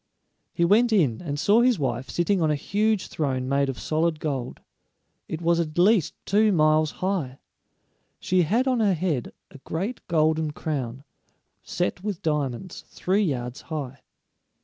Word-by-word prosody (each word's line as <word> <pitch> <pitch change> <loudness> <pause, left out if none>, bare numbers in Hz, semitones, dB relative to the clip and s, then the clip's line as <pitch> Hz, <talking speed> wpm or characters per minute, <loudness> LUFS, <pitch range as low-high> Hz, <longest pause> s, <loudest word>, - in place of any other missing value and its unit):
He 170 - +1
went 225 +6 +4
in, 150 - +2
and 145 -4 -4
saw 205 +9 +4
his 245 -2 +3
wife 130 -2 -2
sitting 180 +2 +1
on 160 - +2
a 150 - +2
huge 210 +6 0
throne 130 -4 -2
made 140 0 +1
of 130 - -4
solid 160 0 0
gold. 135 -6 -3 0.7
It 160 +1 -5
was 170 0 +3
at 160 -1 -3
least 190 -1 +3
two 210 +1 +3
miles 155 -2 +3 0.2
high. 160 -10 -2 0.8
She 185 0 +2
had 225 - +1
on 255 -2 +2
her 205 -4 +3
head 155 -7 -2 0.2
a 140 - -13
great 190 - -4
golden 155 -2 +1
crown, 135 -5 -4 0.6
set 180 +1 -3
with 205 -3 -4
diamonds, 150 +1 -2
three 195 +3 0
yards 125 - -2
high. 140 -4 -6
160 Hz, 155 wpm, -25 LUFS, 140-195 Hz, 0.8 s, went